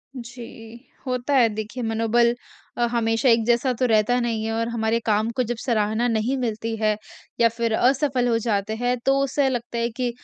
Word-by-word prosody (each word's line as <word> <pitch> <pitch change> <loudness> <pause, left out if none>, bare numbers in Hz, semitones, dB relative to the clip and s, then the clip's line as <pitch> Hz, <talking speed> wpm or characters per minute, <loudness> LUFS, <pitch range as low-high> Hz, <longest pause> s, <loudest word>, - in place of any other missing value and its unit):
जी। 235 0 -11 0.2
होता 250 +2 -2
है 245 -3 +6
देखिए, 215 +3 -5
मनोबल 230 +1 +2 0.4
अ, 240 - +2
हमेशा 230 +1 +1
एक 230 -1 +4
जैसा 240 +2 +2
तो 255 - +2
रहता 225 +1 +2
नहीं 230 -2 -1
है 225 - -2
और 230 0 -1
हमारे 230 0 0
काम 215 +1 +1
को 255 - +2
जब 240 - -1
सराहना 220 0 +1
नहीं 230 +3 0
मिलती 225 -2 -3
है 215 -1 +1 0.4
या 230 -1 +5
फिर 230 0 -2
असफल 260 0 +2
हो 230 -1 +2
जाते 215 -1 -1
हैं, 245 +2 0
तो 270 0 +3
उससे 275 0 +1
लगता 240 -1 -4
है 235 0 0
कि 245 +1 -2
235 Hz, 195 wpm, -23 LUFS, 225-245 Hz, 0.4 s, है